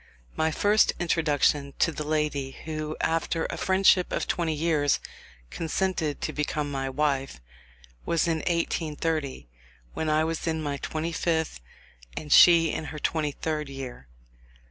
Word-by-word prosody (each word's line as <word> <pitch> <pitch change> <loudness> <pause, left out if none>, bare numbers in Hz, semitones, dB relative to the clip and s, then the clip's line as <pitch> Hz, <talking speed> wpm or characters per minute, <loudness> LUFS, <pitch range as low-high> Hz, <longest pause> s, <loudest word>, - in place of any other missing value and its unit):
My 160 0 +1
first 205 +6 +3
introduction 150 -4 +1
to 165 - +2
the 155 - -5
lady 150 -3 -1
who, 155 -1 -4
after 165 0 0
a - - -4
friendship 190 -1 +3
of - - -1
twenty 165 -3 -1
years, 150 -2 +1 0.5
consented 165 -2 -1
to - - -2
become 150 0 -2
my 135 -1 -2
wife, 135 - -1 0.6
was 170 +1 +1
in 165 -1 +1
1830, 160 - -2 0.5
when 160 - -2
I 155 +1 +3
was 165 +1 -3
in 160 -1 0
my 145 -1 -2
twenty 160 +4 -3
fifth 160 - -1 0.6
and 150 -2 0
she 165 -2 +7
in 160 - -4
her 150 +1 -7
twenty 150 0 -1
third 150 0 -3
year. 130 - -8
155 Hz, 145 wpm, -27 LUFS, 145-165 Hz, 0.6 s, she